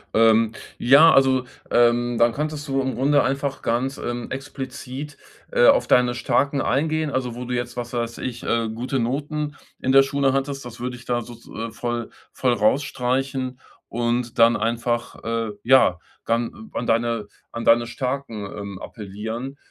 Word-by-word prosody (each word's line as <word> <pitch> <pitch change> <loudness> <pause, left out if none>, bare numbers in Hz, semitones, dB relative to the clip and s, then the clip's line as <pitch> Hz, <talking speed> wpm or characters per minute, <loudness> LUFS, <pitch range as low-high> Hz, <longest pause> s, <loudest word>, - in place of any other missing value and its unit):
Ähm, 110 0 +4 0.2
ja 145 +6 +7
also, 130 -1 +4 0.3
ähm, 120 0 +3
dann 120 0 +4
könntest 150 +3 -3
du 135 0 +1
im 130 0 -2
Grunde 145 +3 +3
einfach 135 0 -2
ganz, 130 +4 -1
ähm, 120 0 -4
explizit, 135 +1 -6 0.3
äh, - - +5
auf - - +5
deine 125 -1 +4
Starken 140 +3 +1
eingehen. 155 +2 0
Also, 125 -2 -2
wo 125 - -5
du 125 0 -4
jetzt, 120 0 -3
was 120 -1 -5
weiß 115 -1 -3
ich, 120 -2 -5
äh, 115 -1 0
gute 125 +3 -2
Noten 145 +4 -2 0.2
in 130 - +1
der 135 0 +7
Schule 135 0 +1
hattest. 135 +1 -2
Das 120 -1 -10
würde 125 +1 -4
ich 125 - -12
da 120 -1 0
sozu 120 0 -12
äh, 115 0 -4
voll 120 0 -3 0.2
voll 125 -2 +1
rausstreichen. 130 +2 0 0.3
Und 120 0 -1
dann 115 0 +6
einfach, 120 +2 -2
äh, 115 -1 -2
ja, 120 -9 +5 0.3
dann 120 - -2
an 120 - -3
deine 115 -2 +1 0.2
an 115 0 -5
deine 120 +1 +5
Starken, 125 -3 -4
ähm, 100 -1 -7
appellieren. 110 +6 -6
125 Hz, 165 wpm, -23 LUFS, 115-135 Hz, 0.3 s, ja